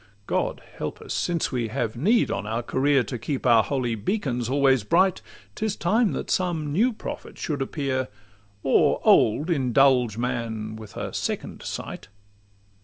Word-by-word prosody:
God -, -, -1 dB, 0.2 s
help -, -, -4 dB
us! -, -, -6 dB
Since 170 Hz, -2 st, -1 dB
we 120 Hz, -4 st, -1 dB
have 115 Hz, -1 st, -2 dB
need 210 Hz, -, +2 dB
on 100 Hz, -, -3 dB
our 115 Hz, +2 st, -2 dB
career 135 Hz, +1 st, +2 dB
To 125 Hz, -2 st, -5 dB
keep 130 Hz, +5 st, -3 dB
our 115 Hz, -3 st, +6 dB
holy 125 Hz, -2 st, -1 dB
beacons 125 Hz, -, -2 dB
always 135 Hz, -3 st, +3 dB
bright, 180 Hz, -, +3 dB, 0.3 s
'Tis 215 Hz, -, -2 dB
time 215 Hz, +5 st, +2 dB
that -, -, -4 dB
some 165 Hz, -5 st, 0 dB
new 225 Hz, -, +3 dB
prophet 220 Hz, -, -8 dB
should 145 Hz, -3 st, -3 dB
appear, 135 Hz, -2 st, -1 dB, 0.6 s
Or -, -, +3 dB
old 145 Hz, +11 st, +4 dB
indulge 130 Hz, -5 st, +3 dB
man 115 Hz, -3 st, -3 dB
with 110 Hz, -2 st, -11 dB
a -, -, -4 dB
second -, -, -3 dB
sight. -, -, -6 dB
130 Hz, 155 wpm, -25 LUFS, 115-160 Hz, 0.6 s, our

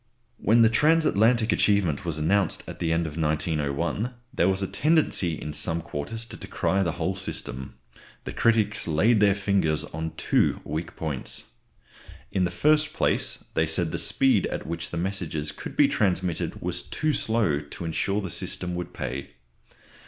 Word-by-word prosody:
When 115 Hz, +2 st, +4 dB
the 110 Hz, -, +6 dB
transatlantic 120 Hz, -5 st, +3 dB
achievement 100 Hz, -5 st, +2 dB
was 85 Hz, -3 st, -2 dB
announced 95 Hz, +6 st, +1 dB
at -, -, -8 dB
the 85 Hz, -1 st, 0 dB
end 85 Hz, +1 st, +1 dB
of 80 Hz, 0 st, -6 dB
1901, 80 Hz, -, -1 dB, 0.2 s
there 95 Hz, -8 st, +3 dB
was 95 Hz, +1 st, 0 dB
a -, -, -1 dB
tendency 95 Hz, -, +2 dB
in 75 Hz, -, -5 dB
some 80 Hz, +2 st, 0 dB
quarters 85 Hz, +8 st, -5 dB
to 115 Hz, -, -10 dB
decry 95 Hz, -, -1 dB
the 85 Hz, -4 st, 0 dB
whole 95 Hz, -, -2 dB
system. 65 Hz, -8 st, -5 dB, 0.5 s
The -, -, -6 dB
critics 110 Hz, -2 st, +2 dB
laid 100 Hz, +9 st, +3 dB
their 100 Hz, -1 st, +4 dB
fingers 95 Hz, -6 st, +1 dB
on 80 Hz, +1 st, -5 dB
two -, -, +2 dB
weak 80 Hz, +3 st, -5 dB
points. 75 Hz, -5 st, -3 dB, 0.9 s
In 95 Hz, -2 st, +1 dB
the -, -, 0 dB
first 150 Hz, -, +2 dB
place, -, -, +1 dB
they 80 Hz, -, +2 dB
said, 80 Hz, +1 st, +2 dB
the -, -, -1 dB
speed 130 Hz, -8 st, +3 dB
at -, -, -5 dB
which 85 Hz, +1 st, -4 dB
the 85 Hz, -, -5 dB
messages 85 Hz, -5 st, -2 dB
could -, -, -9 dB
be -, -, +6 dB
transmitted 90 Hz, -4 st, -1 dB
was 90 Hz, 0 st, -1 dB
too 155 Hz, -1 st, -1 dB
slow 110 Hz, -, +1 dB
to 75 Hz, +3 st, -8 dB
insure 100 Hz, +5 st, -1 dB
that 95 Hz, -, -5 dB
the -, -, -5 dB
system 90 Hz, +2 st, -4 dB
would 90 Hz, -1 st, -5 dB
pay. 65 Hz, +1 st, -4 dB
90 Hz, 170 wpm, -26 LUFS, 80-105 Hz, 0.9 s, the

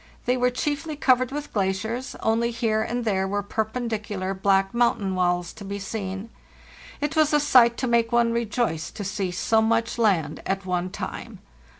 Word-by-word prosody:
They 250 Hz, -, +2 dB
were 250 Hz, 0 st, +2 dB
chiefly 295 Hz, +5 st, -2 dB
covered 255 Hz, -3 st, +3 dB
with 295 Hz, +1 st, -5 dB
glaciers, 220 Hz, +5 st, -2 dB
only 230 Hz, +1 st, +1 dB
here 225 Hz, -2 st, 0 dB
and 240 Hz, +2 st, -2 dB
there 190 Hz, -3 st, +1 dB
were 205 Hz, +1 st, -1 dB
perpen 220 Hz, +4 st, -2 dB
dicular 205 Hz, -4 st, -3 dB
black 195 Hz, 0 st, +2 dB
mountain 235 Hz, -5 st, +1 dB
walls 175 Hz, -1 st, 0 dB
to 205 Hz, -, -11 dB
be 200 Hz, +1 st, -4 dB
seen. 195 Hz, +1 st, -5 dB, 0.7 s
It 295 Hz, +2 st, -1 dB
was 310 Hz, -1 st, +3 dB
a 295 Hz, -, +5 dB
sight 250 Hz, -5 st, +5 dB
to -, -, -1 dB
make 235 Hz, -1 st, +2 dB
one 235 Hz, -1 st, +3 dB
rejoice 230 Hz, -7 st, -1 dB
to 205 Hz, -, -7 dB
see 195 Hz, -1 st, -2 dB
so 220 Hz, +5 st, +2 dB
much 230 Hz, +1 st, +1 dB
land 175 Hz, -10 st, +1 dB
at 195 Hz, 0 st, -2 dB
one 180 Hz, 0 st, -1 dB
time. -, -, -6 dB
220 Hz, 180 wpm, -25 LUFS, 195-240 Hz, 0.7 s, a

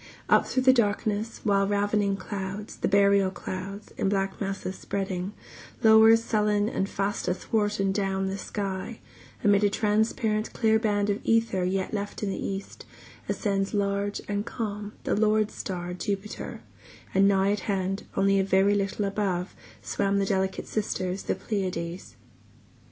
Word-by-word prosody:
Up -, -, +5 dB
through 260 Hz, -, 0 dB
the 260 Hz, 0 st, +7 dB
darkness, 215 Hz, -1 st, 0 dB
While 195 Hz, -1 st, +3 dB
ravening 205 Hz, 0 st, +1 dB
clouds, 195 Hz, +1 st, -5 dB
the -, -, -1 dB
burial 200 Hz, -1 st, +4 dB
clouds, 195 Hz, +2 st, -7 dB
in 195 Hz, -, +1 dB
black 195 Hz, 0 st, -1 dB
masses 195 Hz, -1 st, -3 dB
spreading, 190 Hz, -1 st, -3 dB, 0.5 s
Lower 220 Hz, 0 st, +8 dB
sullen 210 Hz, -2 st, +1 dB
and 195 Hz, -3 st, -1 dB
fast 200 Hz, 0 st, -2 dB
athwart 205 Hz, +3 st, 0 dB
and 195 Hz, 0 st, +1 dB
down 195 Hz, -1 st, 0 dB
the 190 Hz, +1 st, -3 dB
sky, 195 Hz, +2 st, -4 dB, 0.4 s
Amid 205 Hz, 0 st, +4 dB
a 205 Hz, -, +5 dB
transparent 215 Hz, +1 st, 0 dB
clear 220 Hz, -2 st, +3 dB
band 205 Hz, -2 st, +1 dB
of 200 Hz, -, -2 dB
ether 225 Hz, -5 st, +2 dB
yet 190 Hz, +2 st, -1 dB
left 205 Hz, 0 st, -4 dB
in 200 Hz, -, 0 dB
the -, -, -4 dB
east, 195 Hz, 0 st, -5 dB, 0.5 s
Ascends 195 Hz, -1 st, 0 dB
large 200 Hz, 0 st, 0 dB
and 205 Hz, 0 st, -1 dB
calm 210 Hz, -2 st, -5 dB
the -, -, 0 dB
lord 215 Hz, 0 st, +2 dB
star 180 Hz, -1 st, -5 dB
Jupiter, 200 Hz, +2 st, -4 dB, 0.5 s
And 195 Hz, +1 st, +5 dB
nigh 195 Hz, 0 st, +3 dB
at 205 Hz, -, 0 dB
hand, 195 Hz, -1 st, -2 dB
only 195 Hz, 0 st, +4 dB
a -, -, +3 dB
very 195 Hz, +1 st, +3 dB
little 200 Hz, 0 st, 0 dB
above, 195 Hz, -3 st, -1 dB, 0.3 s
Swim 195 Hz, -, 0 dB
the 200 Hz, -, +2 dB
delicate 190 Hz, -1 st, -1 dB
sisters 185 Hz, -3 st, -2 dB
the -, -, -1 dB
Pleiades. 180 Hz, -4 st, -4 dB
200 Hz, 150 wpm, -27 LUFS, 195-210 Hz, 0.5 s, Lower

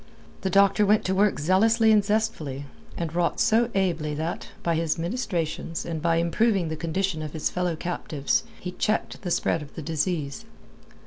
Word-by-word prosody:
The 190 Hz, -, -1 dB
doctor 200 Hz, +2 st, +4 dB
went 210 Hz, +1 st, +3 dB
to 190 Hz, -, +1 dB
work 200 Hz, +2 st, +3 dB
zealously 220 Hz, +8 st, +4 dB
and 210 Hz, -1 st, +5 dB
zestfully, 195 Hz, -10 st, -1 dB, 0.3 s
and 165 Hz, -2 st, -3 dB
wrought 175 Hz, 0 st, 0 dB
so 230 Hz, +2 st, +3 dB
ably 165 Hz, -6 st, 0 dB
that, 160 Hz, +3 st, -3 dB, 0.2 s
by 170 Hz, -, +1 dB
his 165 Hz, -1 st, 0 dB
ministrations 170 Hz, -4 st, -3 dB
and 165 Hz, -2 st, -4 dB
by 165 Hz, 0 st, +2 dB
improving 170 Hz, +2 st, +2 dB
the 160 Hz, -, -2 dB
condition 170 Hz, +1 st, -1 dB
of 155 Hz, -1 st, -5 dB
his 160 Hz, -, -1 dB
fellow 180 Hz, -2 st, -1 dB
captives, 155 Hz, -4 st, -1 dB, 0.2 s
he 180 Hz, -, -5 dB
checked 215 Hz, +4 st, -1 dB
the 180 Hz, -, -4 dB
spread 165 Hz, -1 st, +1 dB
of 145 Hz, -1 st, -11 dB
the 160 Hz, -, -6 dB
disease. 155 Hz, -2 st, -2 dB
170 Hz, 175 wpm, -26 LUFS, 160-195 Hz, 0.3 s, and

